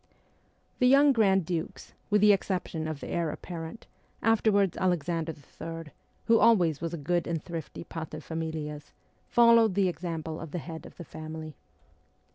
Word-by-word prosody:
The 250 - +5
young 280 +2 +6
grand 195 -6 +3
dukes, 165 -1 -4 0.2
with 210 -1 +3
the 210 0 +7
exception 180 -5 -2
of 155 -3 -5
the - - -6
heir 170 -2 0
apparent, 165 +5 -7 0.4
afterwards 210 -4 +3
Alexander 170 -2 -1 0.3
III., 165 -2 -6 0.3
who 230 0 +5
always 175 -10 +4
was 170 0 -3
a - - -6
good 170 +3 -1
and 165 -3 -2
thrifty 165 -2 -6
paterfamilias, 155 -2 -5 0.4
followed 230 -4 +5
the 195 -2 +3
example 165 -2 -4
of 165 - -7
the 175 - -4
head 160 +1 -7
of - - -17
the 170 - -8
family. 155 -1 -8
170 Hz, 150 wpm, -28 LUFS, 160-195 Hz, 0.4 s, the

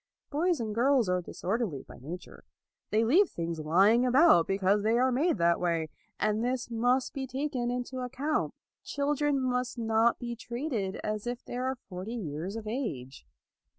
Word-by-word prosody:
Boys 335 +3 +1
and 220 -2 -3
girls 250 0 +3
are 180 0 +1
disor 195 +5 -3
derly 160 - -3
by - - -13
nature. 165 +8 -9 0.5
They 220 +2 +2
leave 350 - +5
things 165 -1 -4
lying 195 +10 +4
about, 255 - +5
because 195 +1 +2
they 220 +3 +2
are 255 +1 +3
made 290 +3 +2
that 170 -1 +3
way. 165 -3 0 0.3
And 215 +1 +1
this 245 -1 -2
must 245 +3 +1
be 265 -1 -4
taken 260 -2 -2
into 250 +1 -3
account. 265 +5 -2 0.3
Chil 285 +1 -1
dren 290 -1 +1
must 250 -1 -1
not 225 0 +2
be 240 -1 -5
treated 235 -5 -3
as 215 +1 -3
if 245 0 -4
they 245 - -5
were 260 +1 -1
forty 190 +5 -6
years 175 -1 -4
of 225 -1 -6
age. 210 - -5
235 Hz, 175 wpm, -29 LUFS, 195-260 Hz, 0.5 s, leave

